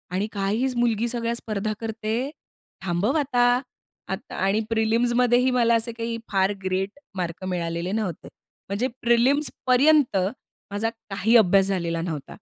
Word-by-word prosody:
आणि 205 +3 0
काय 200 0 -1
ही 260 +3 +1
मुलगी 235 -1 +1
सगळ्या 235 -1 -1
स्पर्धा 215 -2 -3
करते. 225 +3 -2 0.6
थांबव 190 - 0
आता." 250 -4 +2 0.8
आणि 195 +3 0
प्रिलिम्समध्येही 240 +3 +2
मला 235 -2 +3
असे 230 +1 -1
काही 230 0 -4
फार 195 +1 +2
ग्रेट 190 +7 -2 0.2
मार्क 175 0 -4
मिळालेले 170 0 -2
नव्हते. 205 -7 -3 0.4
म्हणजे 215 +6 0
प्रिलिम्सपर्यंत 260 +1 +3 0.5
माझा 210 +3 0 0.2
काही 205 +4 +2
अभ्यास 195 -2 +5
झालेला 170 -3 -1
नव्हता. 160 -5 -5
220 Hz, 125 wpm, -24 LUFS, 195-240 Hz, 0.8 s, अभ्यास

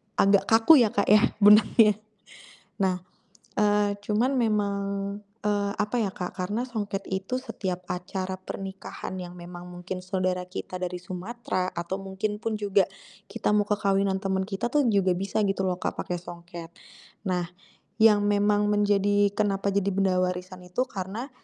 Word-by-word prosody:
agak 200 0 +4
kaku 230 +8 +7
ya, 225 -4 +3
Kak, 200 - +1
ya 210 +1 +5
benangnya. 210 +1 +6 0.8
Nah, 185 -2 +1 0.6
eee, 205 -1 +3
cuman 225 +6 +1
memang, 210 -3 +1 0.7
eee, 205 -1 +1
apa, 210 +3 0
ya, 200 - -1
Kak, 180 - -5
karena 205 +6 -1
songket 205 -5 -4
itu 190 +6 -2
setiap 185 -8 -4
acara 185 +1 -3
pernikahan 190 0 -7
yang 175 0 -8
memang 175 0 -9
mungkin 180 +1 -6
saudara 185 -1 -1
kita 185 - -7
dari 180 0 -3
Sumatera 185 +1 -4
atau 170 +3 -3
mungkin 205 +2 -3
pun 225 -1 -1
juga, 200 -1 +3 0.5
kita - - 0
mau 210 - +4
ke 210 - +2
kawinan 195 -1 +1
temen 190 -1 -1
kita 215 +3 -2
tuh, 295 - +4
juga 195 -3 +3
bisa 195 +4 -2
gitu 195 0 0
loh, 180 -1 -1
Kak, - - -2
pakai 180 - -3
songket. 170 -1 -10 0.6
Nah, 180 -2 0 0.6
yang 210 -2 +6
memang 205 0 +2
menjadi 205 -1 +3
kenapa 200 -1 +1
jadi 200 0 +1
benda 190 -1 +2
warisan 180 0 -3
itu 180 +7 -2
karena, 210 +3 -5
195 Hz, 155 wpm, -26 LUFS, 185-210 Hz, 0.8 s, kaku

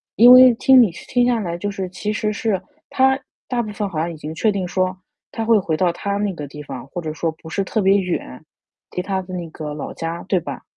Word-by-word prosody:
因 240 +3 +8
为 255 -1 +9
听 260 +2 +6
你 225 - +4
听 245 +7 0
下 245 -2 +2
来 170 -4 -3
就 205 +3 -3
是 195 -1 -4
其 190 +3 -4
实 215 0 -1
是 205 -2 -1 0.3
他 265 0 +3 0.3
大 245 -2 0
部 215 -2 -5
分 205 0 -2
好 160 - -4
像 170 +2 -1
已 - - -8
经 155 +1 -7
确 215 +7 +1
定 195 -2 -2
说 185 +1 -1 0.3
他 225 - -3
会 225 -1 +5
回 165 -4 -1
到 180 +1 +2
他 200 +2 -3
那 205 -1 -1
个 150 -4 -7
地 150 +2 -10
方， 130 -2 -8
或 175 +5 -6
者 155 -2 -4
说 165 +1 -2
不 160 +1 -13
是 195 - -1
特 215 +3 -1
别 195 +1 +4
远， 180 -8 -4 0.5
离 180 - 0
他 190 0 -2
的 185 0 -10
那 175 -2 -5
个 155 -1 -6
老 150 - -6
家， 165 +1 -5
对 185 -1 +1
吧？ 140 -5 -7
185 Hz, 275 characters per minute, -20 LUFS, 165-215 Hz, 0.5 s, 为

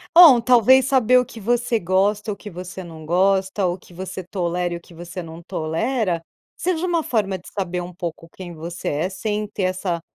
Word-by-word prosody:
bom 315 -9 +10
talvez 250 +2 +5
saber 255 -2 +4
o 250 - 0
que 230 - -11
você 240 +2 +1
gosta, 200 +4 +1
o - - -3
que 210 - -10
você 185 +1 -8
não 160 -2 -10
gosta, 190 +3 +2
o 175 +1 -1
que 180 - -18
você 185 +1 -6
tolera 175 -1 -2
e - - -3
o - - -13
que 170 - -17
você 175 +2 -7
não 165 0 -10
tolera, 170 +3 -1 0.3
seja 365 -1 -1
uma 340 -2 +1
forma 200 -7 0
de 180 - -16
saber 180 -3 -3
um 175 +1 -8
pouco 170 -1 -6
de - - -19
saber - - -27
quem 180 -2 -7
você 170 +2 -6
é, 155 +5 -1
sem 210 +2 -2
ter 200 - -4
essa 185 -2 -1
190 Hz, 220 wpm, -22 LUFS, 175-225 Hz, 0.3 s, bom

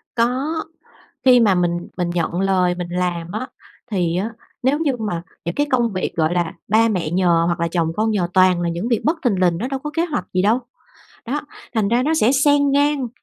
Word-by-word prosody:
Có. 260 +7 0 0.6
Khi 250 -2 +7
mà 210 -4 +4
mình 175 -1 -1
mình 175 -1 -1
nhận 175 +1 -1
lời 185 -2 +2
mình 175 -1 -5
làm 175 -1 -2
á 220 +5 -3 0.4
thì 175 -4 0
á 200 +5 -1 0.3
nếu 265 +4 +2
như 290 -5 0
mà 210 -7 -3 0.2
những 170 +1 -3
cái 290 - +1
công 240 -3 +2
việc, 185 -1 -3
gọi 160 +1 +1
là, 175 -2 0 0.2
ba 220 +3 +4
mẹ 180 -7 -1
nhờ 175 -1 +3
hoặc 170 0 -1
là 170 - +1
chồng 165 -1 0
con 220 +1 +1
nhờ 190 -5 0
toàn 185 -2 +4
là 175 - -1
những 170 +7 -3
việc 235 -3 +1
bất 320 +3 +1
thình 205 -7 +1
lình 175 -2 +2
nó 240 +7 -3
đâu 270 0 -3
có 295 - -3
kế 330 - +1
hoạch 300 - -3
gì 185 - +2
đâu. 215 +5 +3 0.7
Đó, 280 +6 -1 0.3
thành 215 -3 +1
ra 240 +3 +2
nó 310 +4 +1
sẽ 250 -5 +3
xen 285 +1 +3
ngang 285 -2 +1
200 Hz, 225 wpm, -20 LUFS, 175-255 Hz, 0.7 s, Khi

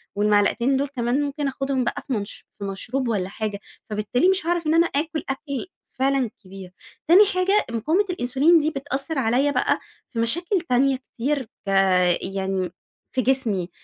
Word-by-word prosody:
والمعلقتين 210 +5 +2
دول 280 +1 0
كمان 250 0 -1
ممكن 285 0 -2
آخدهم 270 -1 -1
بقى - - -2
في 270 - -1
منش 205 -2 -4
في - - -6
مشروب 225 +7 -3
والَّا 195 -5 -1
حاجة، 205 -1 -4 0.3
فبالتالي 215 - +1
مش 380 -4 +1
هاعرف 340 -1 0
إن 310 - +3
أنا 335 +1 +5
آكُل 310 +1 -2
أكل 280 +3 -4 0.2
فعلًا 265 -2 +1
كبير، 190 -1 -11 0.4
تاني 370 +6 +8
حاجة 375 +3 +2
مقاومة 320 - +1
الانسولين 305 +2 +3
دي 310 - +1
بتأثّر 275 +1 -4
عليَّ 260 +4 +2
بقى 250 - +1 0.3
في 230 - -5
مشاكل 345 - +1
تانية 265 +2 +3
كتير 265 +2 -3 0.2
ك - - -1 0.5
يعني 190 -1 -2 0.4
في 260 - 0
جسمي، 225 -9 0
265 Hz, 160 wpm, -23 LUFS, 220-300 Hz, 0.5 s, تاني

